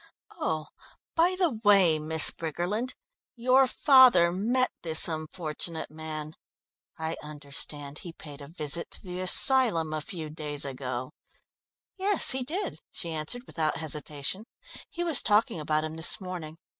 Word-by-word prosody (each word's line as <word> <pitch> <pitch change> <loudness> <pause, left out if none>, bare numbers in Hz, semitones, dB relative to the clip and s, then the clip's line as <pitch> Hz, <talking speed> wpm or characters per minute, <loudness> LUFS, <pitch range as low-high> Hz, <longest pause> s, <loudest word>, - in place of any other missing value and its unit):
Oh, 155 -1 -3 0.5
by 345 +3 +2
the 330 - 0
way, 190 -7 +4
Miss 155 +1 +8
Briggerland, 180 - -4 0.4
your 255 +2 +3
father 255 - +5
met 240 +8 0
this 160 -2 +5
unfortunate 160 0 -5
man. 155 -1 -7 0.6
I 160 0 -4
understand 145 -1 -7
he 175 - -9
paid 150 -3 -12
a 140 - -10
visit 155 +1 -3
to - - -3
the 180 -1 -7
asylum 185 - +5
a 155 - -3
few 155 -1 -7
days 150 -2 -5
ago?" 130 -2 -5 0.9
"Yes, 395 +1 +3
he 260 0 -1
did," 350 +10 -5
she 170 - -6
answered 160 +10 -4
without 155 -8 -2
hesitation. 155 +4 -4 0.4
"He 345 - -5
was 330 -5 0
talking 215 -2 +1
about 155 0 -1
him 155 0 -6
this 160 - 0
morning. 175 -5 -8
165 Hz, 140 wpm, -27 LUFS, 155-225 Hz, 0.9 s, Miss